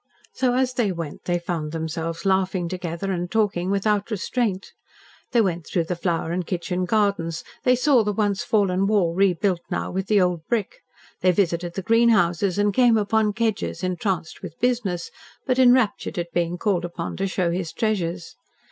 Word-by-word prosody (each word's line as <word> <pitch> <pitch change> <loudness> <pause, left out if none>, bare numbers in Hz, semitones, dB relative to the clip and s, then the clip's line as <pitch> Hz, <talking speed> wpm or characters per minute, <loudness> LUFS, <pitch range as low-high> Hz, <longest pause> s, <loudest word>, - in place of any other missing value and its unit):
So 250 -2 +1
as 255 0 +1
they 235 -5 +1
went 165 -4 -6
they 175 -1 +1
found 165 -3 -4
themselves 165 +2 -4
laughing 190 -2 +1
together 180 +1 -4
and 175 -1 -2
talking 200 -4 0
without 200 +1 +1
restraint. 210 -1 -2 0.6
They 235 - +4
went 175 -5 -1
through 175 - 0
the 175 +2 -3
flower 170 -1 -1
and 180 +1 -1
kitchen 180 +1 -2
gardens; 200 -5 0 0.2
they 250 - +5
saw 255 -2 +4
the 210 - 0
once 205 -1 0
fallen 195 -3 +1
wall 195 -6 +2
rebuilt 185 -1 +2
now - - -2
with 190 +1 -3
the 210 -2 +4
old 180 -3 +1
brick; 235 - -2 0.4
they 185 - +4
visited 175 -2 0
the 195 - -3
greenhouses 205 -5 +3
and 205 0 +2
came 240 0 +4
upon 210 0 +1
Kedgers 220 -4 -2
entranced 185 -2 -2
with 165 -4 -9
business, 225 -8 -1 0.3
but 255 0 +1
enraptured 250 -7 +3
at 170 -1 -4
being 175 0 0
called 190 -3 0
upon 170 -1 -5
to 195 - 0
show 185 -2 0
his 175 -2 -3
treasures. 180 -6 -2
190 Hz, 175 wpm, -23 LUFS, 175-215 Hz, 0.6 s, they